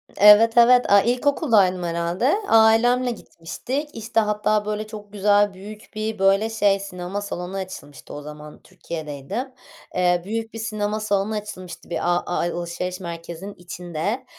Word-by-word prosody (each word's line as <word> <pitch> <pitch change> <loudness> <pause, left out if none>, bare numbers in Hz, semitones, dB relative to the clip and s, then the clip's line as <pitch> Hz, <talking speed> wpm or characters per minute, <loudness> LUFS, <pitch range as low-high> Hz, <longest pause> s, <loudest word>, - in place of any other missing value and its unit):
Evet, 210 +3 +7
evet, 245 -1 +6
aaa, 200 - +7
ilkokuldaydım 235 - +2
herhâlde. 170 - 0
Ailemle 235 +3 +4
gitmiştik. 245 - -6
İşte, 225 0 -1
hatta, 210 0 +1
böyle, 215 0 -3
çok 210 -1 -10
güzel 205 0 +3
büyük 210 +3 -11
bir, 215 0 -3
böyle, 195 +3 +3
şey 205 -3 +2
sinema 195 0 -5
salonu 185 -1 -5
açılmıştı 165 -7 -8
o 145 - -7
zaman 150 0 -11
Türkiye'deydim. 170 - -6 0.4
Eee, 180 -1 +2
büyük 225 +2 -4
bir 225 - -7
sinema 215 -1 -2
salonu 210 0 -1
açılmıştı 185 -4 -8
bir 170 - -2
a 175 0 +1
a 175 - -3 0.2
alışveriş 175 +2 -4
merkezinin 170 +2 -7
içinde. 175 +6 -4
205 Hz, 140 wpm, -22 LUFS, 175-220 Hz, 0.4 s, Evet